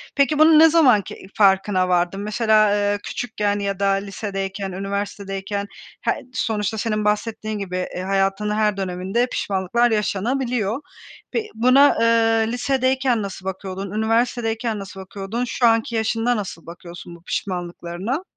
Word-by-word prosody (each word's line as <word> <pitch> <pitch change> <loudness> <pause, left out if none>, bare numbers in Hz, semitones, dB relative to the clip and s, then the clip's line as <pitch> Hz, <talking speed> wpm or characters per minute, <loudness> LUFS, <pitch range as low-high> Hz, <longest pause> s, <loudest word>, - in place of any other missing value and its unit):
Peki 280 +2 +2
bunu 310 0 +7
ne 325 0 +8
zaman 270 -10 +5
ki - - -9 0.2
farkına 190 -2 +3
vardın? 180 +2 +1
Mesela, 215 -1 +3
eee, 205 0 +1
küçükken 210 -4 -2
ya 200 -1 -3
da 200 - +2
lisedeyken, 195 0 -3
üniversitedeyken 200 +1 -4 0.3
he - - +1 0.2
sonuçta 215 -2 -1
senin 215 -1 -1
bahsettiğin 215 0 -1
gibi, 185 -2 -5 0.2
eee, 180 - -3
hayatının 195 +2 0
her 210 -2 +1
döneminde 190 +6 -1
pişmanlıklar 205 +4 0
yaşanabiliyor. 230 +3 -1 0.5
Pe 455 - -1
buna, 255 +5 +5
eee, 225 -1 +3
lisedeyken 260 -1 +1
nasıl 195 -1 -7
bakıyordun, 190 0 -5
üniversitedeyken 225 0 0
nasıl 195 0 -9
bakıyordun, 195 +5 -5
şu 240 0 0
anki 225 +1 +1
yaşında 225 +2 +1
nasıl 190 -5 -6
bakıyorsun 170 0 -10
bu 170 - -18
pişmanlıklarına? 180 - -4
210 Hz, 135 wpm, -21 LUFS, 195-230 Hz, 0.5 s, ne